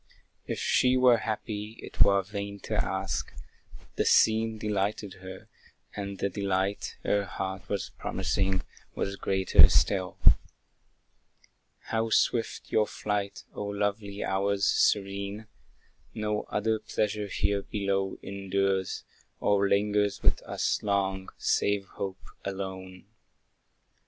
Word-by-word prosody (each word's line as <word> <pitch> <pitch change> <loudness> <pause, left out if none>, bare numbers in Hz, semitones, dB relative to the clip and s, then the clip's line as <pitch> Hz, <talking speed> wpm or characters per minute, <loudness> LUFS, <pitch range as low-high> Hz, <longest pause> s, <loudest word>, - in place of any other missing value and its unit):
If - - -2
she 130 0 +3
were 125 -2 +6
happy, 110 0 -4
it - - -6
were 100 -1 +6
vain 100 0 -5
to - - -5
ask; - - -1 0.7
The - - +3
scene 110 0 +4
delighted 105 -1 -2
her, 95 0 -9 0.5
and 100 -1 -4
the 100 - 0
delight 100 0 -1
Her 100 0 +2
heart 95 -1 -5
was 100 -2 -2
promising, 95 -1 0 0.3
was 100 - -2
greater 95 -1 +5
still. 95 -3 +2 1.8
How 115 0 +1
swift 115 +1 +1
your 105 -1 +3
flight, 105 -1 -3
O - - -6
lovely 100 0 -2
hours 100 +1 +1
serene! 100 +1 +1 0.7
No 105 -1 -1
other 110 +1 0
pleasure 105 -1 -1
here 100 +1 0
below 100 -1 -1
endures, 95 -1 -1 0.4
Or 100 -1 +2
lingers 105 0 +1
with - - +3
us - - -1
long, 95 -2 0
save 100 -1 +1
hope 95 -1 -5 0.2
alone. 95 -1 -6
100 Hz, 110 wpm, -28 LUFS, 95-105 Hz, 1.8 s, were